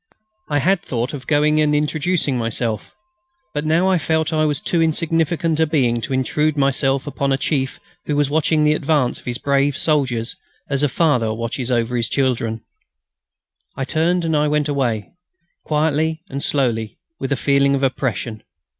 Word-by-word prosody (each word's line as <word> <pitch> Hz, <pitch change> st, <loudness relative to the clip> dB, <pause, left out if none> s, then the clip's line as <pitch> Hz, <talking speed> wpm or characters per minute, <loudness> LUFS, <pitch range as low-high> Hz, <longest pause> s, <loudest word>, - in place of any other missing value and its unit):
I 145 Hz, -, +1 dB
had 185 Hz, +5 st, +2 dB
thought 125 Hz, +3 st, -3 dB
of 130 Hz, -3 st, -7 dB
going 150 Hz, 0 st, +3 dB
and 150 Hz, -1 st, +2 dB
introducing 150 Hz, 0 st, +1 dB
myself; 115 Hz, -1 st, -3 dB, 0.6 s
but 150 Hz, -, -2 dB
I -, -, -2 dB
now 180 Hz, +4 st, +3 dB
felt 160 Hz, 0 st, 0 dB
that -, -, -1 dB
I 155 Hz, -, +3 dB
was 150 Hz, -2 st, 0 dB
too 170 Hz, -, 0 dB
insignificant 165 Hz, 0 st, 0 dB
a 160 Hz, -, +3 dB
being 125 Hz, -6 st, +1 dB
to 135 Hz, -, -5 dB
intrude 150 Hz, +4 st, 0 dB
myself 135 Hz, -1 st, +1 dB
upon 140 Hz, -1 st, -2 dB
a 135 Hz, -, +2 dB
chief 135 Hz, -1 st, -1 dB, 0.3 s
who 150 Hz, -, 0 dB
was 145 Hz, -1 st, +2 dB
watching 155 Hz, +1 st, +2 dB
the 150 Hz, 0 st, +4 dB
advance 145 Hz, -4 st, +1 dB
of -, -, -19 dB
his 120 Hz, -1 st, -2 dB
brave 140 Hz, +1 st, +1 dB
soldiers, 130 Hz, -7 st, +1 dB, 0.4 s
as 140 Hz, 0 st, +1 dB
a 145 Hz, -, +3 dB
father 125 Hz, -6 st, +2 dB
watches 115 Hz, +2 st, -3 dB
over 120 Hz, 0 st, 0 dB
his 115 Hz, -2 st, +1 dB
children. 115 Hz, -4 st, -1 dB, 1.1 s
I 135 Hz, -, -2 dB
turned 170 Hz, +4 st, +1 dB
and 160 Hz, -, 0 dB, 0.2 s
went 150 Hz, 0 st, +1 dB
away, 125 Hz, -7 st, -1 dB, 0.5 s
quietly 160 Hz, +1 st, 0 dB
and 140 Hz, -, -4 dB
slowly, 115 Hz, -6 st, -1 dB, 0.2 s
with 135 Hz, +1 st, -4 dB
a 140 Hz, -, +1 dB
feeling 140 Hz, +1 st, +3 dB
of 135 Hz, -, -2 dB
oppression. 125 Hz, -4 st, -2 dB
140 Hz, 170 wpm, -20 LUFS, 130-155 Hz, 1.1 s, the